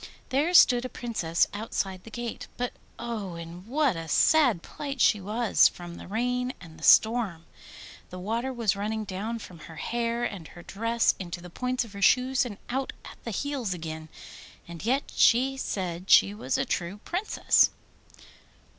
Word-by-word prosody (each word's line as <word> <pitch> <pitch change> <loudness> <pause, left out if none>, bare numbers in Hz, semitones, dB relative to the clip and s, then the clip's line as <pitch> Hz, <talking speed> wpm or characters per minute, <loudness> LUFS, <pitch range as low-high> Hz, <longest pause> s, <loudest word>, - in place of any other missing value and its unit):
There 290 +6 +1
stood 245 -7 +7
a 255 - -4
Princess 180 -11 0
outside 195 -3 -3
the - - -9
gate; 240 0 -6
but 245 0 -2 0.2
oh, 225 -6 -5
in 170 +3 -9
what 275 - +2
a 165 0 -6
sad 250 - +4
plight 280 -2 -6
she 210 -3 +4
was 215 +4 +4
from 175 -1 -10
the - - -10
rain 250 +5 -1
and 160 -3 -13
the - - -13
storm! 220 -8 +4 0.6
The 180 - -8
water 230 +8 -2
was 230 -5 0
running 215 +2 -2
down 210 +4 -4
from 185 -6 -11
her 160 - -10
hair 235 +6 -2
and 190 -9 -4
her 175 - -13
dress 230 +5 +1
into 175 -2 -5
the 175 0 -11
points 250 +4 -1
of 215 - -14
her 200 - -8
shoes 255 +4 +3
and 205 -4 -8
out 265 +2 -2
at - - -12
the - - -5
heels 245 -4 -2
again. 160 -1 -7 0.6
And 170 0 -9
yet 260 +5 +1
she 260 +3 +4
said 185 -7 -4
she 200 - +6
was 210 - -2
a 265 - 0
true 190 -3 -3
Princess! 370 +5 +3
220 Hz, 170 wpm, -27 LUFS, 180-245 Hz, 0.6 s, stood